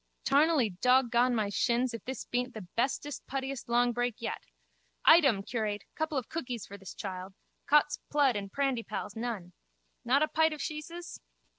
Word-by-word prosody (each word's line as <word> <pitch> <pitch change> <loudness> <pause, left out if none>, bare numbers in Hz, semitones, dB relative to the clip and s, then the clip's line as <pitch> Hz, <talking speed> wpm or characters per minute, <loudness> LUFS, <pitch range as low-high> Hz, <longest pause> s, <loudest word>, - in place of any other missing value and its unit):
Tarnally 285 -5 +3
dog 250 -1 +4
gone 245 +1 +3
my 215 -3 0
shins 240 +4 +1
if 230 - -6
this 260 -2 -5
beent 245 0 -2
the 215 -4 -7
bestest 275 +4 -1
puttiest 270 -1 -4
longbreak 245 0 +2
yet. 235 - -5 0.6
Item, 275 - +6
curate, 210 -3 -2
couple 315 -2 -2
of 255 - -2
cookies 250 -8 -4
for 200 - -10
this 195 -2 -10
child. 190 -1 -6 0.3
Cot's 295 0 +4
plood 285 -5 +3
and 200 -1 -4
prandypalls, 235 -7 -2
none! 220 -6 -4 0.5
Not 270 +5 +3
a - - +2
pite 320 0 +2
of 305 - -7
sheeses? 335 +3 -6
245 Hz, 160 wpm, -30 LUFS, 220-280 Hz, 0.6 s, Item